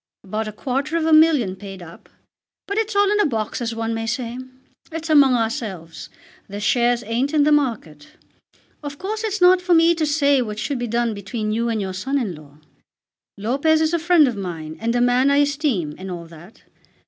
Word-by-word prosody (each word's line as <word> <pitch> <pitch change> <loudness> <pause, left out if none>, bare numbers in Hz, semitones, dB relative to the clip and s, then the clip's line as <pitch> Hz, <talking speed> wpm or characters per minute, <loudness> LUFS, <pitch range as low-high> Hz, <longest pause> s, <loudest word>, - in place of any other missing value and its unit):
About 215 +3 -4
a - - -4
quarter 270 +8 -2
of 320 - -1
a 320 - +3
million 305 - +4
paid 195 -2 -10
up. 170 0 -14 0.6
But 400 +2 -2
it's 440 -1 -2
all 405 0 +3
in 420 - +1
a - - +4
box 220 -3 -3
as 230 -1 -3
one 225 0 -2
may 225 0 -3
say. 235 +1 -3 0.5
It's 325 0 -4
among 275 -4 +6
ourselves. 205 -8 -4 0.4
The 200 +1 -6
shares 240 +3 +1
ain't 245 +7 -1
in 295 - +4
the 300 - +3
market. 225 - -1 0.7
Of 285 -1 -7
course 430 +5 -4
it's 425 -2 -2
not 360 0 +6
for 360 -1 +2
me 330 +1 +5
to 320 -2 -1
say 285 -2 +2
what 210 -3 -5
should 265 +4 -3
be 240 - -3
done 235 0 0
between 210 +2 -4
you 230 +2 -1
and 225 -1 -1
your 190 -2 -4
son 265 +10 -2
in 225 -9 -2
law. 150 -2 -15 0.8
Lopez 275 +10 +1
is 320 +1 +1
a 340 - +2
friend 330 -2 +4
of 245 - -2
mine, 165 -5 -6
and 230 +1 -1
a 245 - +2
man 245 +2 +3
I 280 - +3
esteem, 280 - 0
and 190 +1 -7
all 175 -2 -6
that. 165 +5 -16
245 Hz, 210 wpm, -21 LUFS, 210-305 Hz, 0.8 s, among